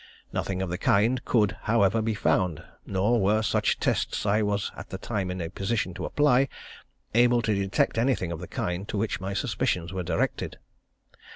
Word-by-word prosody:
Nothing 95 -1 -2
of 90 - -4
the 90 - -3
kind 115 +8 +2
could, 110 -4 +2
however, 110 -1 +3
be 110 0 -1
found, 90 -5 +1 0.2
nor 105 +5 +2
were 105 +3 +3
such - - +1
tests, - - 0
as - - -5
I 105 +1 +3
was 105 -1 -1
at - - -9
the 95 - -5
time 95 -1 -3
in 90 0 -4
a 85 - -2
position 100 -1 -1
to 90 - -5
apply, 140 -2 +3 0.7
able 120 +1 +4
to 110 - +1
detect 100 +3 +1
anything 115 -8 +1
of 85 - -4
the 90 - -7
kind 90 +3 -3
to - - -3
which 105 -2 -1
my 95 +1 -3
suspicions 105 -8 -1
were 95 - -2
directed. 85 -1 -2
100 Hz, 190 wpm, -27 LUFS, 95-115 Hz, 0.7 s, able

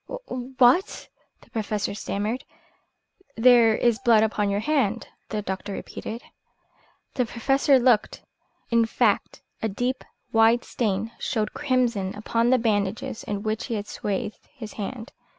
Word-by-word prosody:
"What?" 255 - +1 0.3
the - - -23
Professor 210 -3 -2
stammered. 210 +4 -3 0.9
"There 230 -2 +6
is 235 -1 +2
blood 230 -4 +5
upon 210 -2 0
your 200 +1 0
hand," 235 -5 0 0.2
the 210 -1 -3
doctor 195 +1 -4
repeated. 225 +4 -7 0.9
The 250 - +1
Professor 270 +4 +3
looked. 240 -4 +2 0.5
In 230 -1 +3
fact, - - 0 0.2
a 220 - 0
deep, 245 +6 -2 0.3
wide 225 +2 +4
stain 220 -1 -2
showed 215 -3 -1
crimson 245 -9 0
upon 230 +3 0
the 255 - +5
bandages 220 +2 -1
in 205 -1 -3
which 215 -1 -2
he 230 - -2
had 205 -1 -3
swathed 205 +1 -3 0.2
his 220 -6 -8
hand. 225 +3 -6
225 Hz, 135 wpm, -25 LUFS, 210-250 Hz, 0.9 s, There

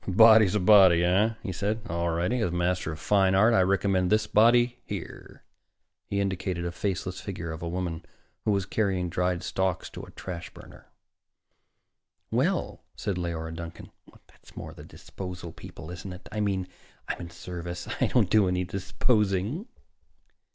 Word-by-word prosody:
"A - - -1
body's 110 0 +7
a - - +3
body, 95 -3 +7
eh?" 100 +6 +3
he 95 - -3
said. 105 +4 -2
"All 85 -2 -1
righty. 90 +9 0
As 110 - +1
a - - -5
master 90 -1 0
of 80 - -7
fine 95 +2 +3
art, 110 +5 +5
I 95 - +5
recommend 95 -1 +2
this 110 0 +3
body 120 +3 +4
here." 100 -5 -8 0.6
He 100 - -1
indicated 95 -3 -2
a 85 - -2
faceless 95 0 -3
figure 85 -5 -5
of 80 +1 -7
a 85 - -3
woman 85 -2 -3 0.4
who - - -1
was 100 -2 +1
carrying 95 -4 0
dried 90 0 0
stalks 95 -3 -1
to - - -8
a - - -11
trash 85 -2 -7
burner. - - -14 1.4
"Well," - - 0
said 100 -3 -3
Leora 80 -2 -3
Duncan, 85 0 -8 0.3
"that's - - -20
more - - -7
the - - -12
disposal 90 -3 -8
people, 80 +1 -10
isn't 90 +2 -7
it? 90 - -12
I 105 - -3
mean, 95 -3 0 0.4
I'm - - -3
in 85 - -7
service. 85 0 -7
I - - +4
don't - - +2
do 105 -3 +5
any 90 0 0
disposing." 100 - 0
95 Hz, 170 wpm, -27 LUFS, 85-105 Hz, 1.4 s, body's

